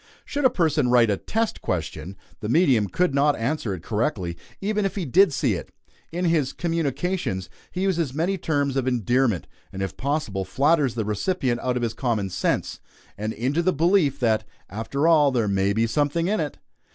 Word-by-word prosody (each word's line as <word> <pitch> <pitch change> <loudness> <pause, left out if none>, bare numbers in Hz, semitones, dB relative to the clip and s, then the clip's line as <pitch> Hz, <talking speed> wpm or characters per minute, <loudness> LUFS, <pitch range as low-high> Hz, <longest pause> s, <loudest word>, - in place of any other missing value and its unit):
Should 285 -1 -2
a - - +8
person 160 - +1
write 120 -3 +5
a 100 - 0
test 225 - -2
question, 85 +1 -4 0.2
the 105 - -4
medium 130 - +4
could 175 - 0
not 145 +1 +3
answer 120 -1 -1
it 85 - -11
correctly 105 - -1 0.2
even 210 +1 0
if 195 - -1
he 190 -4 -2
did 185 +6 +5
see 130 -4 +1
it. 90 - -5 0.4
In 175 +2 -2
his 155 -6 +1
"communications" 165 - -2 0.2
he 185 - -4
uses 170 -7 0
many 165 +8 0
terms 145 -3 0
of 130 -1 0
endearment, 120 -4 +1 0.3
and 95 0 -4
if 95 - -4
possible 140 -9 -1
flatters 140 - +2
the 110 -3 -1
recipient 120 - -1
out 125 -1 0
of 120 - -2
his 115 -1 -1
common 110 -7 -1
sense, - - -1 0.4
and 110 +2 -3
into 130 +9 0
the 185 +1 +2
belief 160 -3 +2
that 110 -3 +2 0.3
"after 125 - -1
all 155 -4 +5
there 120 -5 0
may 100 0 +1
be 110 +3 +2
something 145 +8 0
in 210 +1 +1
it!" 150 -3 -3
135 Hz, 190 wpm, -24 LUFS, 110-165 Hz, 0.4 s, a